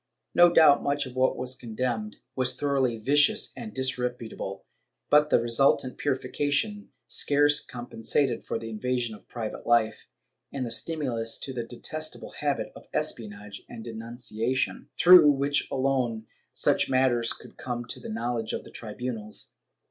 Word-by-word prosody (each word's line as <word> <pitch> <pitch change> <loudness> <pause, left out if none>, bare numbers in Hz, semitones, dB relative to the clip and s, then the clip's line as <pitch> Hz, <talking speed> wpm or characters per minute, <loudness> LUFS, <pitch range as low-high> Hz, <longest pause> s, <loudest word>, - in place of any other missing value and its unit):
No 175 0 +7
doubt 155 -4 +6
much 145 0 0
of 130 -1 -9
what 130 0 +2
was 125 0 -3
condemned 115 -3 -3 0.2
was 130 -1 +1
thoroughly 135 -5 +1
vicious 145 - +3
and 220 - -7
disreputable, 125 - -3 0.5
but 150 +1 +6
the - - +5
resultant 125 +2 +2
purification 145 +10 -1 0.2
scarce 145 0 +3
com 120 -1 -8
pensated 120 +2 0
for - - -3
the 115 0 -7
invasion 120 +1 -2
of 105 - -14
private 115 -3 -6
life 110 -2 +2 0.4
and 135 -2 -3
the 115 - -5
stimulus 120 -5 -1
to 135 - -5
the 120 - -2
detestable 155 +6 -6
habit 145 -2 -2
of - - -13
espionage 105 -9 -4
and 115 -2 -8
denunciation, 115 +2 -3
through 175 -4 +9
which 145 +1 +1
alone 130 -4 0 0.3
such - - +2
matters 130 -3 +2
could - - -10
come 120 -1 -4
to 120 - -4
the - - -8
knowledge 115 0 -2
of - - -3
the - - -14
tribunals. 110 -1 -6
125 Hz, 150 wpm, -27 LUFS, 115-140 Hz, 0.5 s, through